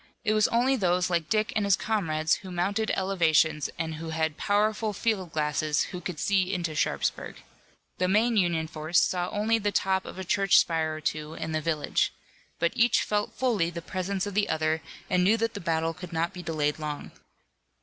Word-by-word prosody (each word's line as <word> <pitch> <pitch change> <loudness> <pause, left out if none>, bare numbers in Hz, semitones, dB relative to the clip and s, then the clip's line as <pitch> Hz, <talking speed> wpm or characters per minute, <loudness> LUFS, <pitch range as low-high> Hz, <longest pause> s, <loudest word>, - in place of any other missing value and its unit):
It 215 -2 +2
was 215 0 +4
only 250 +3 +2
those 180 -4 +1
like 170 -2 0
Dick 215 0 +1
and 215 - +1
his 200 -2 +4
comrades 165 -7 0
who 190 - -10
mounted 200 +5 -1
elevations 160 -5 +2
and 160 -1 -3
who 165 - -5
had 160 -1 -1
powerful 210 +3 +1
field 195 -5 -1
glasses 150 0 0
who 180 -2 -6
could 175 -3 -5
see 190 -2 +1
into 175 -4 -2
Sharpsburg. 150 - -2 0.6
The 185 - +2
main 220 +5 +3
Union 170 -5 +2
force 155 +2 +1
saw 180 -1 0
only 220 +2 +1
the 205 -1 0
top 190 -1 +1
of - - -8
a 190 - -4
church 195 +1 +3
spire 160 -2 +2
or 155 - -7
two 155 0 -3
in 160 - -4
the 155 0 -1
village. 155 -1 0 0.5
But 170 0 0
each 240 0 +3
felt 210 0 -1
fully 230 -9 +1
the 170 -1 -7
presence 190 +2 -2
of 205 - -5
the 205 +1 +1
other 160 0 0 0.3
and 180 -1 +2
knew 210 +5 +4
that 230 0 -1
the 205 - -5
battle 165 -1 0
could 180 0 -9
not 165 +1 -1
be 180 - -7
delayed 155 -3 -1
long. 150 -1 -5
180 Hz, 200 wpm, -27 LUFS, 160-205 Hz, 0.6 s, was